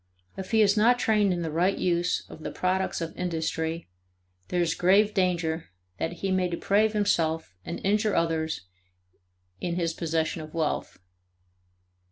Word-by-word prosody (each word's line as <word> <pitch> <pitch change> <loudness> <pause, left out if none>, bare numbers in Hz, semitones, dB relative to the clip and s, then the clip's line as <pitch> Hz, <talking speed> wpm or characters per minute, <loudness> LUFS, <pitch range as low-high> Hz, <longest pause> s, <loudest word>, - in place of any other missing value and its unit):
If 190 -1 -6
he 220 -1 +5
is 200 0 +4
not 235 +3 +5
trained 210 -4 +2
in 175 -1 -1
the 160 - -3
right 180 +5 +1
use 175 0 0
of 155 - -11
the - - -4
products 185 0 -1
of 165 0 -4
industry, 165 -1 -2 0.6
there 180 - -1
is 170 -2 +2
grave 200 +5 +4
danger 170 -4 0 0.3
that 165 - -1
he 190 - +1
may 185 -1 +2
deprave 205 +5 +1
himself 165 - 0
and - - -5
injure 210 +1 +2
others 160 - 0 1.0
in 170 -1 -2
his 170 -2 0
possession 160 -1 -1
of 155 +1 -10
wealth. 160 -2 -2
175 Hz, 155 wpm, -27 LUFS, 165-195 Hz, 1.0 s, he